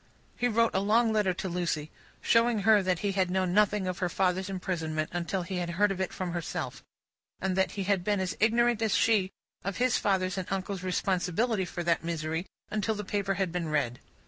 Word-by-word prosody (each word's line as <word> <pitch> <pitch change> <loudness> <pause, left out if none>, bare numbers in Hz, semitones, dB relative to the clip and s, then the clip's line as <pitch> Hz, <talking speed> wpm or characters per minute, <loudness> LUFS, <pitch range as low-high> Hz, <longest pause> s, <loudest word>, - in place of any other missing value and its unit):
He 245 - +1
wrote 230 0 +2
a 190 - +2
long 220 +3 +3
letter 210 -3 +2
to 185 +1 -4
Lucie, 170 -4 -2 0.3
showing 230 -2 +3
her 215 0 +5
that 185 -2 +1
he 200 - +2
had 190 -2 +1
known 185 -1 0
nothing 210 -1 +3
of 185 0 -3
her 180 - 0
father's 185 +1 0
imprisonment, 165 -5 -2
until 175 +2 -2
he 185 +1 -4
had 175 -1 -2
heard 200 +4 +2
of 190 -1 -3
it 190 - -1
from 185 -2 -4
herself, 170 -2 -4 0.6
and 190 -1 -1
that 190 0 +1
he 200 - -3
had 190 -2 +1
been 205 +1 +1
as 185 -1 -2
ignorant 235 +1 +3
as 220 -2 +2
she 205 -4 +3 0.3
of 195 -1 -3
his 250 0 +2
father's 190 -1 0
and 185 - -5
uncle's 195 0 -2
responsibility 185 +3 0
for 175 0 -5
that 170 -1 +1
misery, 165 +1 -3 0.2
until 215 +1 0
the 210 - -4
paper 195 -1 -1
had 190 -2 -1
been 170 -2 -2
read. 125 -5 0
190 Hz, 210 wpm, -29 LUFS, 180-205 Hz, 0.6 s, her